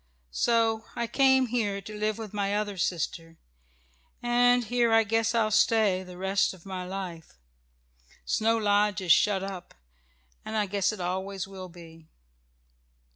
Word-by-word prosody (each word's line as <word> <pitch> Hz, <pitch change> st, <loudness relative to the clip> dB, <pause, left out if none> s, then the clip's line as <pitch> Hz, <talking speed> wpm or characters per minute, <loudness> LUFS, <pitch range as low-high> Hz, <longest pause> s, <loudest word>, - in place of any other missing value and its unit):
So 225 Hz, -, +1 dB
I 235 Hz, -, -1 dB
came 265 Hz, +2 st, +3 dB
here 220 Hz, -5 st, -1 dB
to 210 Hz, +2 st, -9 dB
live 215 Hz, 0 st, -1 dB
with 220 Hz, -3 st, -8 dB
my 200 Hz, -1 st, -1 dB
other 210 Hz, -1 st, -3 dB
sister, 165 Hz, -2 st, -3 dB, 0.9 s
and 245 Hz, 0 st, +3 dB
here 235 Hz, +1 st, +1 dB
I 225 Hz, 0 st, +5 dB
guess 225 Hz, +2 st, 0 dB
I'll 220 Hz, -2 st, +2 dB
stay 215 Hz, -3 st, +3 dB
the 180 Hz, -1 st, -11 dB
rest 190 Hz, +1 st, 0 dB
of 180 Hz, -, -19 dB
my 190 Hz, -1 st, -5 dB
life. 180 Hz, -4 st, -7 dB, 0.9 s
Snow 225 Hz, -, +1 dB
Lodge 205 Hz, -1 st, +2 dB
is 180 Hz, -3 st, +1 dB
shut 195 Hz, +3 st, +4 dB
up, 190 Hz, -2 st, -7 dB, 0.7 s
and 220 Hz, -, -4 dB
I 210 Hz, -, +2 dB
guess 200 Hz, +1 st, 0 dB
it 215 Hz, -4 st, -7 dB
always 190 Hz, +2 st, -3 dB
will 190 Hz, -1 st, -9 dB
be." 165 Hz, -2 st, -14 dB
205 Hz, 150 wpm, -27 LUFS, 185-225 Hz, 0.9 s, I